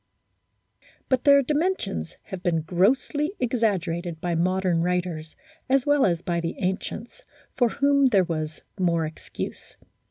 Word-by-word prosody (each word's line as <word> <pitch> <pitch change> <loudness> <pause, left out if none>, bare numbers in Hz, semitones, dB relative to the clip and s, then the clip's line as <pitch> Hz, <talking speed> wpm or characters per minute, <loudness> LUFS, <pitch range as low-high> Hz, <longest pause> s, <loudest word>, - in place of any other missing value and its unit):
But 255 -2 +1
their 280 -1 +7
dimensions 295 - -1
have 190 -2 -7
been 170 -3 +1
grossly 260 - +1
exaggerated 180 -9 -1
by 175 +1 -2
modern 180 0 +1
writers 175 -3 -2 0.3
as 270 -1 +3
well 290 -4 +4
as 170 -1 -1
by 170 -1 -1
the 165 0 -3
ancients, 200 - -4 0.3
for 245 -2 +3
whom 280 +1 +3
there 200 -7 +4
was 155 -3 -4 0.2
more 170 -3 +2
excuse. 155 +1 -7
185 Hz, 130 wpm, -25 LUFS, 170-260 Hz, 0.3 s, their